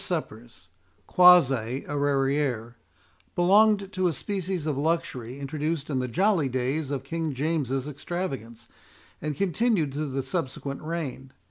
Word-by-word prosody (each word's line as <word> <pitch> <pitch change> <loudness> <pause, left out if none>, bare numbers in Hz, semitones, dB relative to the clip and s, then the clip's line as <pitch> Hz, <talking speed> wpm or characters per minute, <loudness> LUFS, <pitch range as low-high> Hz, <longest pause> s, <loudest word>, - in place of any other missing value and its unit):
Rere - - -5
suppers 115 - -10 0.4
(quasi 135 -9 +5
arrière) 140 -4 0 0.6
belonged 200 +2 +4
to 185 -1 +1
a - - +2
species 185 0 -3
of 150 -3 0
luxury 140 -5 -2
introduced 150 +2 -3
in 130 - 0
the 125 - -1
jolly 175 - +2
days 130 +4 -1
of 140 -2 -3
King 160 0 -3
James's 140 -2 -1
extravagance, 135 - -5 0.5
and 150 0 -3
continued 190 - +1
through 150 +1 -2
the 135 0 -2
subsequent 140 -4 -4
reign. 155 -5 -5
145 Hz, 130 wpm, -26 LUFS, 135-170 Hz, 0.6 s, quasi